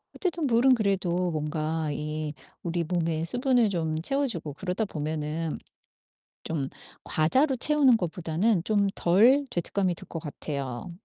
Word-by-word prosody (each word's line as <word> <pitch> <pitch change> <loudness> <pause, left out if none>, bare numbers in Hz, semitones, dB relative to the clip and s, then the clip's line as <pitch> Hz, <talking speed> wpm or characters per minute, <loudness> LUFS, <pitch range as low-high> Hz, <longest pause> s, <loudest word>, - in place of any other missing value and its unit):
어쨌든 345 -5 -1
물은 250 +2 +5
그래도 185 -5 0
뭔가 155 0 -2
이 150 +1 -4 0.3
우리 170 0 -1
몸에 165 -2 -1
수분을 245 - +2
좀 160 -4 -1
채워 275 +9 +1
주고 160 - -4
그러다 185 +7 -2
보면은 155 0 -3 0.9
좀 145 -5 -2 0.4
과자로 260 - +2
채우는 275 -2 +4
것보다는 175 +3 0
좀 205 -1 +2
덜 235 +11 +5
죄책감이 180 +1 0
들 - - -9
것 165 - -5
같아요. 140 -2 -5
175 Hz, 275 characters per minute, -27 LUFS, 155-225 Hz, 0.9 s, 물은